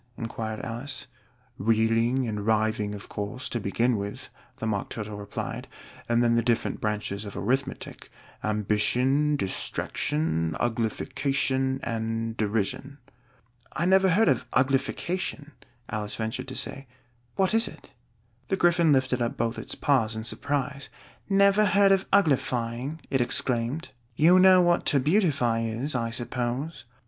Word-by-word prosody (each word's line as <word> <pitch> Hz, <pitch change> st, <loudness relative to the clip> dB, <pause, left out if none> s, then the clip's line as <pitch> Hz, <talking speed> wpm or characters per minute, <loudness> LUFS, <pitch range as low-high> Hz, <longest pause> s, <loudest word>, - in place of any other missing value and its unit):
inquired 110 Hz, -2 st, -4 dB
Alice. 130 Hz, +4 st, -6 dB, 0.5 s
"Reeling 115 Hz, +4 st, +2 dB
and 105 Hz, -2 st, -3 dB
Writhing, 110 Hz, -1 st, +1 dB
of 100 Hz, -, -9 dB
course, 105 Hz, +6 st, -5 dB
to 120 Hz, -, -2 dB
begin 115 Hz, +4 st, +1 dB
with," 105 Hz, +6 st, -6 dB, 0.3 s
the 110 Hz, -, -5 dB
Mock 105 Hz, -3 st, -2 dB
Turtle 105 Hz, -1 st, -5 dB
replied; 100 Hz, 0 st, -5 dB, 0.4 s
"and 120 Hz, 0 st, +3 dB
then 120 Hz, -1 st, +3 dB
the 115 Hz, -, +3 dB
different 115 Hz, 0 st, 0 dB
branches 105 Hz, -1 st, -2 dB
of 100 Hz, -, -7 dB
Arithmetic 130 Hz, +5 st, -3 dB, 0.3 s
Ambition, 120 Hz, +8 st, +2 dB
Distraction, 80 Hz, -, -1 dB
Uglification, 130 Hz, +3 st, 0 dB
and 115 Hz, 0 st, -2 dB
Derision." 115 Hz, +6 st, -2 dB, 0.8 s
"I 155 Hz, +5 st, -1 dB
never 190 Hz, +1 st, +5 dB
heard 205 Hz, +6 st, +4 dB
of 130 Hz, -3 st, +1 dB
'Uglification,'" 140 Hz, +5 st, -1 dB, 0.4 s
Alice 105 Hz, -1 st, -3 dB
ventured 115 Hz, +4 st, -3 dB
to 130 Hz, -, -7 dB
say. 135 Hz, +1 st, -3 dB, 0.5 s
"What 190 Hz, +1 st, +1 dB
is 225 Hz, +1 st, +3 dB
it?" -, -, -12 dB, 0.6 s
The 190 Hz, -, 0 dB
Gryphon 170 Hz, -3 st, +4 dB
lifted 130 Hz, -2 st, +2 dB
up 120 Hz, -, -1 dB
both 115 Hz, +1 st, -1 dB
its -, -, -4 dB
paws 115 Hz, -6 st, +1 dB
in 110 Hz, -, -4 dB
surprise. 140 Hz, +3 st, -2 dB, 0.4 s
"Never 200 Hz, +1 st, +5 dB
heard 200 Hz, -1 st, +4 dB
of 195 Hz, 0 st, +2 dB
uglifying!" 135 Hz, -5 st, +1 dB
it 135 Hz, -, +2 dB
exclaimed. 120 Hz, +6 st, 0 dB, 0.3 s
"You 175 Hz, +6 st, +6 dB
know 185 Hz, -1 st, +7 dB
what 175 Hz, 0 st, +3 dB
to 140 Hz, -, +4 dB
beautify 140 Hz, -, +2 dB
is, 115 Hz, +6 st, -2 dB
I 115 Hz, -2 st, -1 dB
suppose?" 120 Hz, +4 st, -3 dB
125 Hz, 135 wpm, -27 LUFS, 110-145 Hz, 0.8 s, know